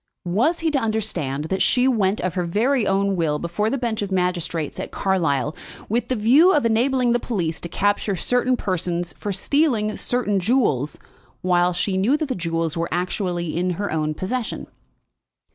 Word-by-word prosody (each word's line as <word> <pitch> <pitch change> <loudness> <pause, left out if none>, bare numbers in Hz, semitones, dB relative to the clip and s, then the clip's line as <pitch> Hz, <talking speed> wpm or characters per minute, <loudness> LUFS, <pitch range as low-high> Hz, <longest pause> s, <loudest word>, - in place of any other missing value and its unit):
"Was 235 - +1
he 325 -1 +1
to 285 - +2
understand 190 - -2
that 190 +4 -2
she 250 +1 +3
went 210 -5 +2
of 185 0 -1
her 180 -2 -2 0.4
own 195 0 +1
will 160 -4 0
before 175 +7 -1
the 275 - -1
bench 235 -4 -2
of 200 -1 -3
magistrates 180 -4 -1
at - - -4
Carlisle, 160 -7 0 0.3
with 235 +2 0
the 255 - 0
view 270 - +5
of 290 -5 +2
enabling 245 +2 +2
the 240 - +2
police 175 -10 -2
to 170 - -5
capture 205 +2 0
certain 245 +6 +1
persons 175 -3 -2
for 205 - -5
stealing 215 0 +1
certain 230 -5 0
jewels, 180 - +1 0.5
while 180 -1 +3
she 185 +2 -1
knew 230 +10 +3
that 305 -2 -3
the - - 0
jewels 165 -3 -2
were 170 0 -2
actually 175 -2 -2
in 180 +2 0
her 205 0 -2
own 155 -1 -1
possession?" 230 +7 -3
195 Hz, 175 wpm, -22 LUFS, 175-240 Hz, 0.5 s, view